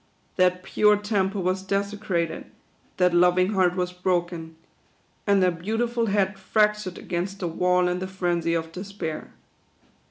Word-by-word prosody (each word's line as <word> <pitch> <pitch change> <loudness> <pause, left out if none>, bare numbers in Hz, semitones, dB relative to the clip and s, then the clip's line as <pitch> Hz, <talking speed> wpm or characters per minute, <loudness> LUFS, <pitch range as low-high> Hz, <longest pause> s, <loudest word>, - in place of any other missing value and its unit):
That 180 0 +2
pure 210 +1 +3
temple 200 -2 -1
was 185 +1 0
desecrated; 195 -3 -2 0.5
that 180 -1 +3
loving 180 +3 +4
heart 185 -2 +2
was 180 -1 -2
broken; 175 -3 -2 0.7
and 200 -2 +4
that 180 -2 +1
beautiful 230 +4 0
head 195 -1 0
fractured 210 -1 +1
against 185 +3 -3
the 180 - -3
wall 180 +2 +2
in 180 0 -1
the 185 - -4
frenzy 175 -3 -1
of 165 0 -3
despair. 185 -3 -6
185 Hz, 135 wpm, -25 LUFS, 180-200 Hz, 0.7 s, loving